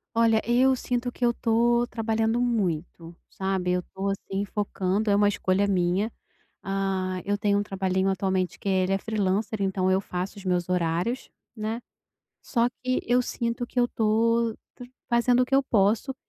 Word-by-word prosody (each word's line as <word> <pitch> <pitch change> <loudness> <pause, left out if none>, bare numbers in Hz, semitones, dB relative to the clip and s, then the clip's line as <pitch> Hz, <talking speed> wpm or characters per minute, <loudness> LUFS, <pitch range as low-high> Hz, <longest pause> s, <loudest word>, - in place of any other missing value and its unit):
Olha, 225 -1 +4
eu 255 +3 +4
sinto 245 -1 -2
que 245 - -1
eu 235 - +3
tô 235 +1 +2
trabalhando 225 0 0
muito, 175 -7 -2 0.2
sabe, 190 -2 -1
eu 180 - +1
tô, 195 +2 -4
assim, 195 0 -3
focando, 205 0 -1
é 200 - +4
uma 205 0 +4
escolha 195 -1 +1
minha, 190 +3 +1 0.5
ah, 190 -1 -1
eu 205 +1 +1
tenho 205 -1 +1
um 205 - +1
trabalhinho 190 -1 -1
atualmente 190 -1 -1
que - - -14
ele 190 0 +2
é - - +3
freelancer, 210 0 -1
então 190 -1 +1
eu 190 +1 +3
faço 185 +1 -5
os 200 - -11
meus 180 -1 0
horários, 180 +7 -1 0.3
né, 220 +2 -4 0.6
só 235 -1 +1
que 255 +1 -2
eu 245 +1 +4
sinto 235 -1 -2
que 250 - -1
eu 240 - +2
tô 230 +1 +1 0.5
fazendo 240 +1 +3
o - - +3
que 265 - -19
eu 270 0 +4
posso 220 +4 +2
205 Hz, 170 wpm, -26 LUFS, 190-235 Hz, 0.6 s, Olha